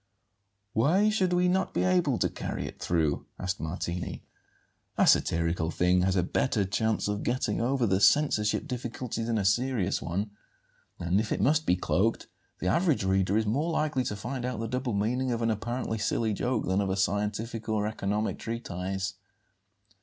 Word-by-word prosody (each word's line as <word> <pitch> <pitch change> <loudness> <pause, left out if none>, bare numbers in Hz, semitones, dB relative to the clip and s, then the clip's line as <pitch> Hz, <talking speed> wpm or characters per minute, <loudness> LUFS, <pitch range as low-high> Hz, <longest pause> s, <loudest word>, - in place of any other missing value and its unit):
"Why 180 - +3
should 190 -4 +1
we 180 0 +3
not 185 +1 0
be - - +2
able 175 -9 +2
to - - +2
carry - - -4
it - - -8
through?" 80 -4 0
asked 95 +1 -3
Martini. 85 +2 -4 0.7
"A - - +5
satirical 85 0 +2
thing 90 +1 +2
has 95 +1 +1
a 90 - +2
better 110 +1 +1
chance 110 +4 0
of 105 0 -2
getting 120 -4 -1
over 125 +1 +1
the 95 -2 +1
censorship 140 -2 +3
difficulty 120 -2 -4
than 115 0 0
a 100 - 0
serious 110 -2 +1
one; 100 +5 -3 0.7
and, 90 +3 +1
if 110 0 -2
it - - 0
must 155 +2 +2
be 90 - +4
cloaked, 100 +5 0 0.3
the - - -6
average 160 - +2
reader 95 +1 +2
is 110 - +1
more 140 +10 0
likely 155 -5 0
to 105 - -2
find 120 +5 -5
out 125 -3 -3
the 115 - -2
double 125 0 -2
meaning 125 +6 0
of 115 -1 -1
an 115 - +2
apparently 115 +1 -3
silly 110 +1 0
joke 125 +5 -1
than 95 +2 +1
of 100 - -1
a 95 - -1
scientific 105 +3 -1
or 105 -1 +1
economic 105 0 -2
treatise." 95 -4 -3
110 Hz, 175 wpm, -28 LUFS, 95-125 Hz, 0.7 s, A